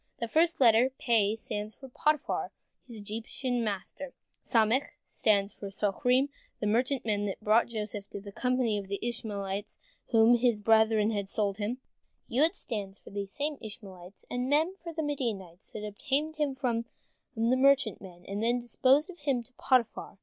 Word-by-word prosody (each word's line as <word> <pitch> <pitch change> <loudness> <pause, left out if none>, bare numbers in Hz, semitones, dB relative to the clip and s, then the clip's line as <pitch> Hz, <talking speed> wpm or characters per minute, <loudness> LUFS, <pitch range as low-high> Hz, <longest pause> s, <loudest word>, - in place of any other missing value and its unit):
The 235 - -3
first 330 +7 +2
letter, 240 0 +6
Pe, 220 -3 +2
stands 215 -1 -5
for 270 - -11
Potiphar, 300 +3 0 0.4
his 235 - -8
Egyptian 230 +4 -3
master; 215 +6 -4 0.3
Samek 230 +4 +3 0.2
stands 200 -2 +1
for 200 - -7
Soharim, 245 +7 +1 0.3
the - - -2
merchantmen 220 -2 +1
that 195 +2 -5
bought 215 +3 +4
Joseph 210 -3 -5
from 200 - -7
the 200 0 -9
company 250 -2 0
of 195 -1 -9
Ishmaelites 205 -4 -3 0.3
to 230 - +1
whom 225 +2 +7
his 235 -3 +2
brethren 220 0 +4
had 200 -2 -2
sold 200 -2 0
him; 215 +4 -2 0.5
Yod 300 +8 +2
stands 200 -3 -5
for - - -15
these 200 -1 -4
same 290 +4 -3
Ishmaelites; 195 -4 -10
and 250 +1 -2
Mem, 315 +5 +3
for 340 - -5
the 320 -1 -3
Midianites 215 - -4
that 210 -1 -5
obtained 290 +9 -2
him 290 -3 0
from 235 -3 -1 0.5
the 230 +3 +2
merchantmen, 225 -10 +2
and 200 +2 -3
then 240 +2 +2
disposed 255 +5 +3
of 350 - -16
him 275 -5 0
to 260 - -26
Potiphar. 245 -5 0
225 Hz, 165 wpm, -30 LUFS, 205-260 Hz, 0.5 s, whom